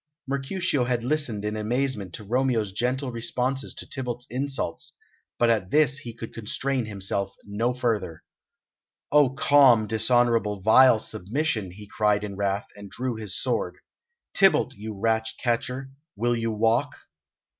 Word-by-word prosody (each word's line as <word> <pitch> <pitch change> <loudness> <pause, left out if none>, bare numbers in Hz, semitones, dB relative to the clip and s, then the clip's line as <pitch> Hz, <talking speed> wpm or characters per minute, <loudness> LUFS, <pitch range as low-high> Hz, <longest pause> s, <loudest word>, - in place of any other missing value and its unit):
Mercutio 140 +1 -1
had 120 -1 -1
listened 125 -7 -1
in 105 0 -2
amazement 110 -2 -1
to - - -9
Romeo's 115 -2 0
gentle 125 +5 -1
responses 125 +3 -2
to - - -7
Tybalt's 125 -2 -4
insults, 135 +2 -3 0.4
but 120 -1 +4
at 105 -5 0
this 145 0 +3
he 120 -5 -7
could 115 0 -9
contain 125 +2 -2
himself 100 -1 -3
no 110 +4 -1
further. 115 -10 -2 0.9
"O 145 -2 +6
calm, 135 -5 +5
dishonourable, 110 -2 +2
vile 125 +3 +7
submission!" 110 - -2
he 105 +4 -11
cried 105 0 +1
in 100 -2 -5
wrath, 100 +1 -1
and 100 -1 -10
drew 125 +5 -3
his 105 -3 -3
sword. - - -1 0.6
"Tybalt, 190 -9 +4
you 105 -2 -8
rat 110 +1 +1
catcher, 125 +2 -2 0.3
will 120 +3 +1
you 115 -1 -1
walk?" 115 +6 +1
115 Hz, 140 wpm, -25 LUFS, 105-130 Hz, 0.9 s, vile